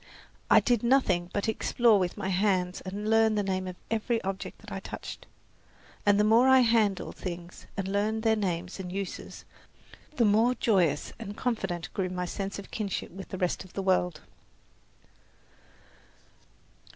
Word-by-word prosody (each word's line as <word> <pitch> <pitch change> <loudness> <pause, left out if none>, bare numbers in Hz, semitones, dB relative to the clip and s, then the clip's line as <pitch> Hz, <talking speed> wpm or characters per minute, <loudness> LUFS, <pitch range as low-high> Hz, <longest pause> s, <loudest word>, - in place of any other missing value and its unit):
I - - +8
did 240 -4 +1
nothing 220 -9 +2
but 205 - -1
explore 220 0 +3
with 180 -1 -2
my 190 - -3
hands 185 -1 +1
and 200 +3 -5
learn 225 0 +4
the 205 - +1
name 185 -1 -2
of 180 - -6 0.2
every 225 +1 0
object 195 0 -4
that - - -13
I - - -3
touched; - - -8 0.8
and 205 0 +5
the - - +5
more 225 +4 +5
I 265 0 +7
handled 225 -5 +2
things 175 -1 -7
and 195 -1 -2
learned 210 +3 0
their 220 -1 +4
names 180 -3 -3
and 180 -2 -5
uses, 195 -1 -6 0.7
the 235 - +3
more 225 +4 +4
joyous 180 - +1
and 205 -2 -7
confident 195 -9 -2
grew 185 -2 -1
my 180 0 -3
sense 195 +2 -4
of 200 - -10
kinship 205 -4 -3
with 190 +2 -9
the 190 - -5
rest 180 0 -1
of 185 - -16
the 195 - -3
world. 180 -4 +1
200 Hz, 165 wpm, -28 LUFS, 185-220 Hz, 0.8 s, I